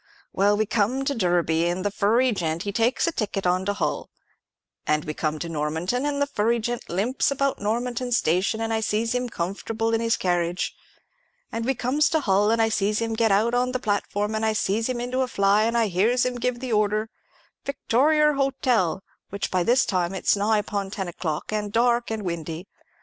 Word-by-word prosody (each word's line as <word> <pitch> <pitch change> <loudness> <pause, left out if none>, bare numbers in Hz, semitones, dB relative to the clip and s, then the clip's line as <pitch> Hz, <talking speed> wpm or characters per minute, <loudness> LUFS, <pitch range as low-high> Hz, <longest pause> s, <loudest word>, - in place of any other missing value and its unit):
Well, 205 +2 +3
we 215 - +1
come 235 +6 0
to 280 - +1
Derby, 175 - +1
and 180 +3 -2
the 205 - +1
furry 230 +6 +2
gent, 170 -4 -2
he 200 - -3
takes 230 +7 +1
a 335 - +1
ticket 200 - -3
on 180 +1 +1
to 205 - 0
Hull; - - -2 0.8
and 150 0 +1
we 155 - -3
come 155 0 -2
to 170 - -5
Normanton, 165 - -1
and 285 -1 -1
the 285 - +3
furry 235 -4 0
gent 240 +1 -4
limps 205 +9 0
about 275 0 0
Normanton 240 +4 -2
station, 195 0 +1
and 225 0 -1
I 220 - +1
sees 220 +1 0
him 250 0 -1
comfortable 220 +5 -2
in 225 - +1
his 230 -1 +1
carriage; 175 -1 -1 0.8
and 230 0 -3
we 270 +1 +1
comes 260 +5 +1
to 320 - +2
Hull, 200 -2 +2
and 230 +1 +2
I 225 - +4
sees 210 -1 0
him 225 -1 -2
get 225 -1 +2
out 215 +4 +2
on 250 +1 +1
the 255 - -1
platform, 205 -1 -1
and 220 0 -1
I 220 0 +2
sees 215 +3 0
him 250 -1 -2
into 250 +2 -1
a 260 - +1
fly, 200 -1 +3
and 230 +1 0
I 230 - +3
hears 215 +7 +2
him 250 -1 -2
give 245 0 -2
the 255 -3 -3
order, 215 +1 +1 0.5
'Victorier 300 +3 +2
Hotel,' 250 - +1 0.3
which 200 0 -4
by 185 - +1
this 240 +7 +3
time 185 -1 -1
it's 190 - +2
nigh 210 +2 +2
upon 205 -2 -2
ten 190 -2 -4
o'clock, 165 +2 -4
and 210 -1 -2
dark 235 +2 +2
and 220 -1 -3
windy. 170 -1 -4
215 Hz, 210 wpm, -24 LUFS, 190-245 Hz, 0.8 s, I